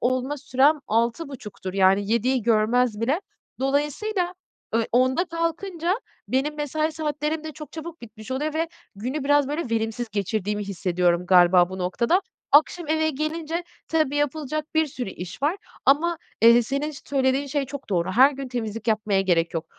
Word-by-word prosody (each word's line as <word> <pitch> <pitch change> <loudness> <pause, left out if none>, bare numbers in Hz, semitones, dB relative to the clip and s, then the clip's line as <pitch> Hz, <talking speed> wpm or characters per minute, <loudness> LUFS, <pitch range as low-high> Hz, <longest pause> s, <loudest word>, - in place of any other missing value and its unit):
olma 255 +4 0
sürem 285 +2 +3
18.30'dur, 230 - -2
yani 195 +2 +3
19.00'u 250 +1 +1
görmez 225 0 +2
bile. 275 +10 +1 0.4
Dolayısıyla, 350 +8 0 0.4
eee, 230 -1 +2
10.00'da 260 +8 +3
kalkınca 335 +1 -2 0.3
benim 275 +4 0
mesai 310 +2 -1
saatlerim 305 0 -2
de 310 - -5
çok 305 -2 -10
çabuk 330 +1 -8
bitmiş 220 +1 -11
oluyor 295 +4 -2
ve 325 +1 0 0.3
günü 260 +8 -4
biraz, 290 -1 +3
böyle, 295 -5 -3
verimsiz 225 +1 -1
geçirdiğimi 210 0 -1
hissediyorum 180 -2 0
galiba 180 -1 +6
bu 190 - -6
noktada. 235 - +1 0.3
Akşam 310 +2 +4
eve 315 0 +2
gelince, 320 +3 -3 0.2
tabii 310 -3 +1
yapılacak 295 +1 -1
bir 315 0 +3
sürü 250 -7 -5
iş 180 +9 -8
var 320 +7 +2 0.3
ama, 325 +4 +3 0.2
eee, 235 +1 +8
senin 280 +5 -2 0.2
söylediğin 270 0 +1
şey 280 0 -1
çok 280 +1 -8
doğru; 175 0 +1
her 260 +6 +7
gün 270 -2 -6
temizlik 225 -2 -4
yapmaya 210 -3 +2
gerek 170 -3 +1
yok. 165 0 -2
265 Hz, 155 wpm, -24 LUFS, 220-310 Hz, 0.4 s, eee